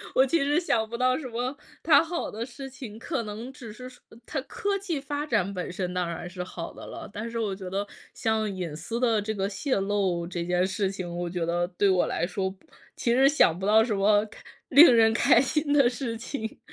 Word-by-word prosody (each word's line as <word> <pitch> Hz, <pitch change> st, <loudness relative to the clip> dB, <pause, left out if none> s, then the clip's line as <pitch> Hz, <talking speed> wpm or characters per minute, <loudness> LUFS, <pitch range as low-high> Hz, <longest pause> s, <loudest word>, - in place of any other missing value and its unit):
我 260 Hz, -, +6 dB
其 330 Hz, +5 st, +1 dB
实 285 Hz, +2 st, +2 dB
想 230 Hz, -11 st, +1 dB
不 235 Hz, -, -4 dB
到 255 Hz, +1 st, +2 dB
什 295 Hz, -, -6 dB
么 250 Hz, +3 st, -3 dB, 0.3 s
它 295 Hz, -3 st, +6 dB
好 335 Hz, +1 st, -3 dB
的 225 Hz, +2 st, -4 dB
事 270 Hz, +2 st, -9 dB
情， 250 Hz, -5 st, -9 dB
可 245 Hz, +1 st, -3 dB
能 220 Hz, +4 st, -7 dB
只 235 Hz, -5 st, -10 dB
是 255 Hz, +2 st, -9 dB
说 255 Hz, -, -18 dB, 0.2 s
它 290 Hz, -, -3 dB
科 400 Hz, +6 st, -2 dB
技 345 Hz, -8 st, -3 dB
发 290 Hz, +1 st, -3 dB
展 210 Hz, -8 st, 0 dB
本 180 Hz, -2 st, -4 dB
身 180 Hz, 0 st, -3 dB
当 180 Hz, -1 st, -1 dB
然 170 Hz, +1 st, -5 dB
是 180 Hz, 0 st, -7 dB
好 170 Hz, -2 st, -7 dB
的 -, -, -10 dB
了。 -, -, -8 dB
但 220 Hz, +3 st, -5 dB
是 230 Hz, -, -5 dB
我 210 Hz, -3 st, -1 dB
觉 190 Hz, -1 st, -7 dB
得， 200 Hz, +2 st, -2 dB, 0.3 s
像 220 Hz, -1 st, 0 dB
隐 180 Hz, -5 st, -4 dB
私 165 Hz, +9 st, -5 dB
的 230 Hz, -4 st, +3 dB
这 220 Hz, +1 st, -3 dB
个 195 Hz, 0 st, -1 dB
泄露 195 Hz, -, 0 dB
这 175 Hz, -1 st, -4 dB
件 180 Hz, +1 st, +2 dB
事 195 Hz, 0 st, -1 dB
情， 185 Hz, -3 st, -5 dB
我 175 Hz, 0 st, -2 dB
觉 170 Hz, -1 st, -2 dB
得 175 Hz, +1 st, 0 dB
对 190 Hz, +2 st, +1 dB
我 185 Hz, -2 st, +3 dB
来 170 Hz, -, -1 dB
说， 190 Hz, +1 st, -2 dB
不 190 Hz, +1 st, -15 dB, 0.3 s
其 235 Hz, -, +1 dB
实 265 Hz, +2 st, +5 dB
想 180 Hz, -, +4 dB
不 190 Hz, -, -2 dB
到 220 Hz, +1 st, +6 dB
什 225 Hz, -2 st, -1 dB
么 205 Hz, +1 st, +3 dB
开 215 Hz, -, -15 dB, 0.3 s
令 280 Hz, -2 st, +9 dB
人 225 Hz, -1 st, +5 dB
开 235 Hz, +1 st, +5 dB
心 290 Hz, +2 st, 0 dB
的 275 Hz, -4 st, +5 dB
事 245 Hz, -2 st, -4 dB
情。 225 Hz, -1 st, -6 dB
220 Hz, 255 characters per minute, -27 LUFS, 190-260 Hz, 0.3 s, 令